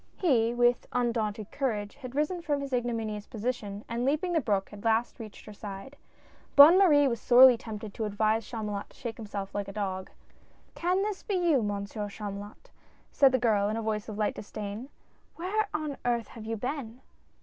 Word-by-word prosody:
He, 240 Hz, -10 st, +3 dB
with 240 Hz, 0 st, +2 dB
undaunted 220 Hz, -4 st, -1 dB
courage, 215 Hz, -7 st, -2 dB
had 255 Hz, -2 st, -9 dB
risen 305 Hz, +5 st, 0 dB
from 295 Hz, -4 st, -1 dB
his 280 Hz, -1 st, -5 dB
igno 245 Hz, -1 st, 0 dB
minious 215 Hz, -2 st, -4 dB
position, 215 Hz, -3 st, -4 dB
and 235 Hz, +1 st, -2 dB
leaping 305 Hz, +7 st, 0 dB
the 325 Hz, -, +2 dB
brook, 200 Hz, -4 st, -1 dB
at 205 Hz, -, -10 dB
last 225 Hz, +2 st, +1 dB
reached 215 Hz, -3 st, -10 dB
her 210 Hz, -, -10 dB
side. 205 Hz, +6 st, -8 dB, 0.6 s
Bonne 310 Hz, +6 st, +10 dB
Marie 295 Hz, -7 st, +6 dB
was 235 Hz, -4 st, -2 dB
sorely 250 Hz, +1 st, +8 dB
tempted 215 Hz, -2 st, -7 dB
to 220 Hz, -, -3 dB
advise 215 Hz, +2 st, +1 dB
Chamulot 210 Hz, -3 st, -5 dB
to -, -, -21 dB
shake 235 Hz, -2 st, -6 dB
himself 200 Hz, -3 st, -6 dB
like 200 Hz, -1 st, -3 dB
a -, -, -6 dB
dog. 190 Hz, -2 st, -3 dB, 0.6 s
"Can 365 Hz, +3 st, 0 dB
this 415 Hz, -2 st, -3 dB
be 410 Hz, -, -2 dB
you. 340 Hz, -7 st, +3 dB
Monsieur 205 Hz, 0 st, -3 dB
Chamulot?" 205 Hz, 0 st, -8 dB, 0.4 s
said 275 Hz, -2 st, +5 dB
the 260 Hz, -, +3 dB
girl 215 Hz, -4 st, +2 dB
in 215 Hz, -, -2 dB
a -, -, -2 dB
voice 215 Hz, 0 st, -2 dB
of 210 Hz, -, -6 dB
light 210 Hz, -1 st, 0 dB
disdain. 210 Hz, +4 st, -7 dB, 0.2 s
" -, -, -37 dB
Where 405 Hz, +5 st, -1 dB
on 305 Hz, -2 st, -3 dB
earth 235 Hz, -2 st, 0 dB
have 220 Hz, -2 st, -10 dB
you 225 Hz, 0 st, -2 dB
been 250 Hz, 0 st, -5 dB
230 Hz, 195 wpm, -29 LUFS, 210-270 Hz, 0.6 s, Bonne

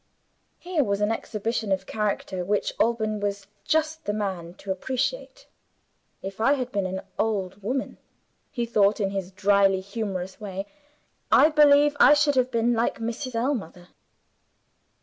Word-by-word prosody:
Here 350 Hz, -4 st, 0 dB
was 200 Hz, -3 st, -1 dB
an 210 Hz, +1 st, +1 dB
exhibition 225 Hz, -1 st, -3 dB
of 190 Hz, -, 0 dB
character 200 Hz, -3 st, -2 dB
which 205 Hz, +3 st, -1 dB
Alban 220 Hz, -2 st, +1 dB
was 200 Hz, -1 st, -3 dB, 0.2 s
just 315 Hz, 0 st, 0 dB
the 205 Hz, -, -1 dB
man 185 Hz, -5 st, -4 dB
to 195 Hz, -, -6 dB
appreciate. 260 Hz, -, -3 dB, 0.8 s
"If 195 Hz, +2 st, -6 dB
I 270 Hz, +5 st, +4 dB
had 255 Hz, -3 st, -3 dB
been 200 Hz, -4 st, -1 dB
an 190 Hz, +1 st, -4 dB, 0.2 s
old 200 Hz, -3 st, -1 dB
woman," 255 Hz, +6 st, -3 dB, 0.5 s
he 240 Hz, -2 st, -2 dB
thought 210 Hz, -2 st, +2 dB
in 195 Hz, -2 st, 0 dB
his 195 Hz, -2 st, -3 dB
dryly 195 Hz, 0 st, +3 dB
humorous 195 Hz, -1 st, -5 dB
way, 195 Hz, -1 st, -5 dB, 0.7 s
"I 305 Hz, -, +7 dB
believe 295 Hz, -1 st, +5 dB
I 295 Hz, -, +8 dB
should 290 Hz, 0 st, +3 dB
have 255 Hz, -1 st, +2 dB
been 235 Hz, 0 st, +1 dB
like 230 Hz, 0 st, 0 dB
Mrs. 230 Hz, +2 st, -4 dB
Ellmother. 225 Hz, -, -3 dB
215 Hz, 150 wpm, -25 LUFS, 195-255 Hz, 0.8 s, I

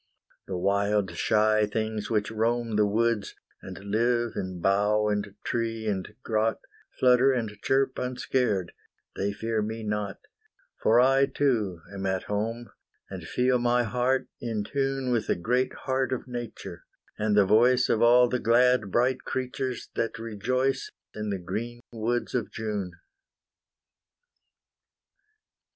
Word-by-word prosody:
The 95 Hz, -, -3 dB
wild 100 Hz, +1 st, +1 dB
shy 110 Hz, 0 st, +2 dB
things 110 Hz, 0 st, -3 dB
which 105 Hz, -2 st, 0 dB
roam 115 Hz, 0 st, 0 dB
The 105 Hz, 0 st, +3 dB
woods, 115 Hz, 0 st, 0 dB, 0.3 s
and 95 Hz, -1 st, -8 dB
live 115 Hz, +4 st, 0 dB
in 95 Hz, -1 st, -4 dB
bough 105 Hz, +3 st, +2 dB
and 105 Hz, -1 st, -2 dB
tree 115 Hz, -1 st, -2 dB
and 100 Hz, 0 st, -3 dB
grot, 110 Hz, -1 st, 0 dB, 0.4 s
Flutter 125 Hz, +1 st, +5 dB
and 120 Hz, -4 st, -1 dB
chirp 135 Hz, 0 st, +1 dB
unscared, 125 Hz, -7 st, -1 dB, 0.4 s
they 100 Hz, +1 st, -1 dB
fear 110 Hz, +1 st, -2 dB
me 110 Hz, +1 st, -4 dB
not, 105 Hz, -2 st, -2 dB, 0.6 s
For 115 Hz, +2 st, +5 dB
I 135 Hz, +2 st, +5 dB
too 110 Hz, -13 st, 0 dB
am 95 Hz, -1 st, -3 dB
at 95 Hz, -1 st, -1 dB
home. 115 Hz, +3 st, -3 dB, 0.4 s
And 90 Hz, -4 st, -7 dB
feel 125 Hz, +4 st, +2 dB
my 120 Hz, 0 st, +2 dB
heart 125 Hz, +4 st, 0 dB
in 115 Hz, -3 st, -2 dB
tune 135 Hz, +1 st, -1 dB
With 120 Hz, -3 st, 0 dB
the -, -, +2 dB
great 125 Hz, +8 st, 0 dB
heart 130 Hz, -1 st, 0 dB
of 130 Hz, 0 st, -3 dB
Nature, 115 Hz, -, -7 dB, 0.4 s
and 105 Hz, 0 st, +1 dB
the 100 Hz, -, +6 dB
voice 125 Hz, +5 st, +4 dB
Of 110 Hz, -, +1 dB
all 120 Hz, +1 st, +6 dB
the 125 Hz, +1 st, -1 dB
glad 120 Hz, -2 st, +3 dB
bright 125 Hz, +5 st, +1 dB
creatures 130 Hz, -1 st, -3 dB
that 115 Hz, -, -2 dB
rejoice 125 Hz, +4 st, -1 dB, 0.2 s
In 105 Hz, 0 st, -4 dB
the 100 Hz, -, -1 dB
green 115 Hz, +7 st, -5 dB
woods 120 Hz, +2 st, -2 dB
of 120 Hz, -4 st, -1 dB
June. 105 Hz, -5 st, -4 dB
115 Hz, 135 wpm, -27 LUFS, 105-125 Hz, 0.6 s, the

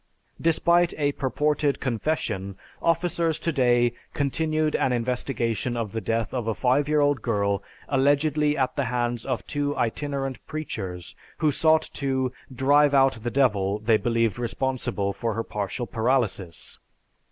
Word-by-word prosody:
Despite 170 Hz, +1 st, +3 dB
a 145 Hz, -2 st, +1 dB
purported 145 Hz, +1 st, 0 dB
confession, 110 Hz, -7 st, -2 dB, 0.2 s
officers 165 Hz, -1 st, +1 dB
to 165 Hz, -, -1 dB
day 120 Hz, -4 st, +3 dB, 0.2 s
continued 155 Hz, +2 st, 0 dB
an 130 Hz, -, +1 dB
investigation 120 Hz, -1 st, -1 dB
of 110 Hz, -4 st, -3 dB
the 115 Hz, -, -3 dB
death 115 Hz, 0 st, -1 dB
of 120 Hz, -4 st, -2 dB
a 110 Hz, -, 0 dB
five 135 Hz, +3 st, +2 dB
year 150 Hz, -1 st, +3 dB
old 145 Hz, -1 st, +2 dB
girl, 100 Hz, -3 st, 0 dB, 0.3 s
allegedly 145 Hz, +2 st, +2 dB
at 130 Hz, -2 st, 0 dB
the 140 Hz, -, 0 dB
hands 120 Hz, -1 st, -2 dB
of 130 Hz, -3 st, -2 dB
two 145 Hz, 0 st, -2 dB
itinerant 135 Hz, +2 st, -2 dB
preachers 95 Hz, -, -5 dB, 0.2 s
who 155 Hz, -, +2 dB
sought 160 Hz, +2 st, +3 dB
to 130 Hz, -2 st, -1 dB, 0.2 s
'drive 140 Hz, +2 st, +4 dB
out 135 Hz, -3 st, +4 dB
the 120 Hz, -, -2 dB
devil' 105 Hz, -7 st, +2 dB
they 110 Hz, +1 st, +3 dB
believed 115 Hz, -1 st, 0 dB
responsible 120 Hz, -4 st, -2 dB
for 110 Hz, +2 st, -2 dB
her 115 Hz, -, -1 dB
partial 105 Hz, +4 st, -3 dB
paralysis. 110 Hz, -6 st, -1 dB
130 Hz, 140 wpm, -25 LUFS, 115-145 Hz, 0.3 s, drive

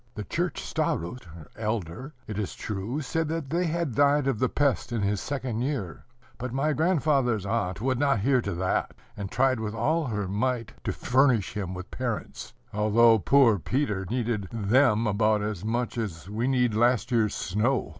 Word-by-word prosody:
The 105 Hz, -, -4 dB
church 175 Hz, -, -2 dB
starost, 100 Hz, +10 st, -2 dB, 0.3 s
it 110 Hz, -, -4 dB
is 105 Hz, -, -3 dB
true, 105 Hz, +8 st, -4 dB
said 160 Hz, +3 st, -1 dB
that 160 Hz, -3 st, -4 dB
they 175 Hz, +1 st, +1 dB
had 165 Hz, -4 st, -1 dB
died 145 Hz, +3 st, +3 dB
of 135 Hz, -6 st, 0 dB
the 130 Hz, -, +2 dB
pest 140 Hz, -4 st, 0 dB
in 115 Hz, -3 st, -1 dB
his 100 Hz, 0 st, 0 dB
second 130 Hz, -5 st, -3 dB
year; 125 Hz, -, -3 dB, 0.3 s
but 125 Hz, 0 st, -4 dB
my 140 Hz, +4 st, +1 dB
grandfather's 140 Hz, -, +1 dB
aunt 100 Hz, -3 st, -1 dB
would 130 Hz, 0 st, 0 dB
not 140 Hz, -6 st, +2 dB
hear 130 Hz, +2 st, +3 dB
to 100 Hz, -5 st, -3 dB
that, 95 Hz, +2 st, -1 dB, 0.2 s
and 100 Hz, -2 st, -5 dB
tried 130 Hz, 0 st, +2 dB
with 110 Hz, 0 st, -4 dB
all 155 Hz, +8 st, +1 dB
her 105 Hz, -6 st, -2 dB
might 115 Hz, +4 st, -1 dB
to -, -, 0 dB
furnish 125 Hz, -5 st, +2 dB
him 95 Hz, -4 st, -4 dB
with 90 Hz, +3 st, -8 dB
parents, 120 Hz, -3 st, -4 dB, 0.2 s
although 110 Hz, +2 st, +5 dB
poor 120 Hz, -3 st, +4 dB
Peter 105 Hz, -, -1 dB
needed 115 Hz, -4 st, -1 dB
them 115 Hz, +1 st, +3 dB
about 105 Hz, 0 st, +2 dB
as 105 Hz, -3 st, -3 dB
much 120 Hz, +2 st, -1 dB
as 95 Hz, -6 st, -5 dB
we 110 Hz, +5 st, -2 dB
need 125 Hz, -4 st, +2 dB
last 120 Hz, +3 st, +2 dB
year's 110 Hz, -4 st, +2 dB
snow. 110 Hz, +7 st, 0 dB
120 Hz, 175 wpm, -27 LUFS, 105-135 Hz, 0.3 s, although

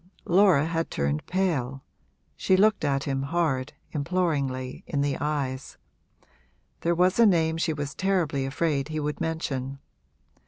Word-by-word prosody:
Laura 180 Hz, -5 st, +5 dB
had 165 Hz, 0 st, -1 dB
turned 70 Hz, +2 st, -1 dB
pale, 140 Hz, -9 st, -1 dB, 0.5 s
she 190 Hz, -, +2 dB
looked 215 Hz, 0 st, +3 dB
at 140 Hz, -2 st, +1 dB
him 135 Hz, -1 st, -1 dB
hard, 140 Hz, -3 st, -1 dB, 0.2 s
imploringly, 140 Hz, -5 st, -1 dB
in 140 Hz, -, -1 dB
the 140 Hz, -1 st, 0 dB
eyes: 140 Hz, -3 st, -3 dB, 1.0 s
there 170 Hz, +1 st, +1 dB
was 180 Hz, +4 st, +2 dB
a 230 Hz, -, +8 dB
name 160 Hz, -4 st, +3 dB
she 165 Hz, 0 st, 0 dB
was 145 Hz, -2 st, -4 dB
terribly 175 Hz, -8 st, 0 dB
afraid 140 Hz, 0 st, -1 dB
he 155 Hz, 0 st, -3 dB
would 150 Hz, 0 st, -3 dB
mention. 140 Hz, -5 st, -3 dB
150 Hz, 135 wpm, -26 LUFS, 135-170 Hz, 1.0 s, a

